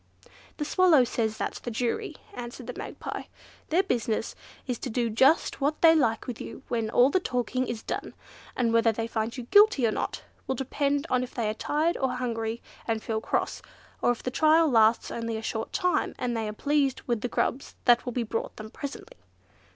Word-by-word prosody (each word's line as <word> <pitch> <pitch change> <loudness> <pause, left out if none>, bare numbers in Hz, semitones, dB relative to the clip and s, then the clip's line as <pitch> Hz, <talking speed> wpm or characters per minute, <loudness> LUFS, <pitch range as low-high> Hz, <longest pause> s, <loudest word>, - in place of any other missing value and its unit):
"The 295 - -2
Swallow 330 -4 +5
says 220 -2 -1
that's - - -3
the - - -5
jury," 235 +1 -2 0.2
answered 240 -5 -7
the - - -5
Magpie. - - -6 0.4
"Their 350 +5 +3
business 225 - -1 0.3
is 250 -3 -3
to 260 - -4
do 235 0 0
just 265 +7 +3
what 290 +2 +1
they 325 -1 +9
like 235 -8 +2
with 245 -3 -6
you - - -8
when 230 -2 -1
all 250 +4 +5
the 375 - +3
talking 255 -4 -1
is 225 -2 -4
done, - - -4 0.4
and 235 -2 +1
whether 230 0 +4
they 225 +1 -3
find 225 +1 -3
you 250 - -4
guilty 410 - +5
or 220 - +2
not, - - -3 0.2
will 265 - 0
depend 280 +3 -1
on 255 -1 +3
if 255 - -6
they 230 -3 0
are - - -1
tired, 310 +9 0
or 265 -1 0
hungry, 230 -2 -3 0.2
and 225 -1 -1
feel 220 -1 -2
cross; - - -1 0.4
or - - +3
if 245 - -1
the 255 - -2
trial 315 +4 +5
lasts 225 -1 +4
only 230 -1 -3
a 220 - -6
short 220 0 -3
time, 360 -1 0
and 245 -2 -2
they 225 -1 -1
are - - -5
pleased 285 +2 +1
with 235 -3 -1
the - - -1
grubs 255 +2 -2
that 240 -1 +5
will 250 - -4
be 245 0 -1
brought 225 0 -3
them 215 0 -9
presently." 395 - -8
245 Hz, 205 wpm, -27 LUFS, 225-280 Hz, 0.4 s, they